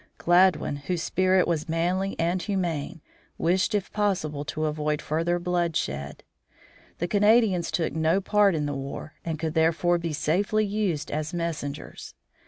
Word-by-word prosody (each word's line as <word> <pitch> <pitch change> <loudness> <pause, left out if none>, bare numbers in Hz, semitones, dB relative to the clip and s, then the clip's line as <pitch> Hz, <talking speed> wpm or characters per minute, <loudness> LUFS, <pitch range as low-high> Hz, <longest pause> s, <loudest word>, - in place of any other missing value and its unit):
Gladwin, 175 -4 +3
whose 165 +4 -3
spirit 185 0 +2
was 160 -1 -1
manly 180 +4 0
and 175 +2 0
humane, 175 -5 -2 0.4
wished 185 +5 +1
if 200 -2 -2
possible 180 -9 -1
to 155 +1 -2
avoid 150 -1 -1
further 165 +3 0
bloodshed. 170 - -2 0.7
The 175 - -2
Canadians 205 -3 +3
took 165 - -1
no 160 +4 +2
part 200 -1 +3
in 150 -1 -1
the 145 - -2
war, 135 +3 -6
and 165 -2 -3
could, 160 0 -3
therefore, 165 +2 +2
be 170 -1 -3
safely 200 +8 +1
used 200 -7 -2
as 155 +2 -3
messengers. 165 -4 -5
170 Hz, 145 wpm, -26 LUFS, 155-185 Hz, 0.7 s, Gladwin